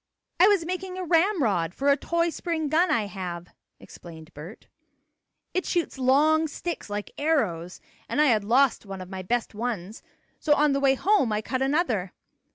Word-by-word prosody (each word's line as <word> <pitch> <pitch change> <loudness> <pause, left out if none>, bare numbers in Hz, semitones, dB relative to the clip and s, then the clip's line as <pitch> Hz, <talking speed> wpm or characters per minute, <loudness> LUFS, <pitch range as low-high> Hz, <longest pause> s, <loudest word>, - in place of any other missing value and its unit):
"I 370 - +7
was 400 -5 +3
making 370 +1 -4
a 370 - -3
ramrod 315 - +1
for 280 +1 0
a 280 - +6
toy 335 +3 -1
spring 320 -3 -3
gun 335 +5 +3
I 220 -3 +1
have," 180 -3 -6 0.3
explained 160 -1 -13
Bert. 165 +9 -11 0.9
"It 370 - 0
shoots 335 -5 -2
long 305 +5 +3
sticks, 335 -3 -6
like 205 0 -5
arrows, 205 - -1 0.3
and - - -1
I 300 - +5
had 220 -7 +3
lost 245 +4 +2
one 195 -2 -8
of 185 +1 -10
my 190 -1 -5
best 235 +6 -2
ones, 215 -3 -4 0.4
so 295 -2 +3
on 295 -1 +3
the 275 - +1
way 270 -1 +3
home 370 - +2
I 210 0 -1
cut 255 +3 -3
another. 265 - 0
270 Hz, 175 wpm, -26 LUFS, 200-325 Hz, 0.9 s, I